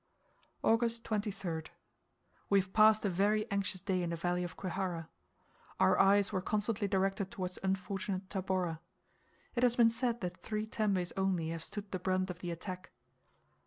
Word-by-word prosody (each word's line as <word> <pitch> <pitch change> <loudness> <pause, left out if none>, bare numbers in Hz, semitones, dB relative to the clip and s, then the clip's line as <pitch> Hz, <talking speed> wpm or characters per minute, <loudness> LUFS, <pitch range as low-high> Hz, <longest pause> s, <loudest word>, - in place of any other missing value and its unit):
August 230 0 +2
23rd. 195 -7 -2 0.8
We 200 - +5
have 190 0 -4
passed 215 0 +6
a - - +3
very 210 +4 +2
anxious 200 -2 -1
day 185 -1 0
in 175 - -1
the 170 - -1
valley 175 +1 0
of 175 -2 -6
Kwihara. 180 -3 -3 0.7
Our - - +4
eyes 200 +1 +5
were 190 - +1
constantly 210 +1 0
directed 195 0 0
towards 185 -5 -4
unfortunate 195 0 -2
Tabora. 185 -4 -1 0.7
It 240 - 0
has 245 -1 +4
been 230 -2 +6
said 235 0 -1
that 180 -1 -3
three 215 -1 -2
tembes 200 -5 0
only 190 -4 0
have 165 -1 -3
stood 205 +1 -5
the 185 - -2
brunt 185 0 0
of 175 - -9
the 175 - -5
attack. 185 +2 -6
195 Hz, 160 wpm, -33 LUFS, 180-210 Hz, 0.8 s, passed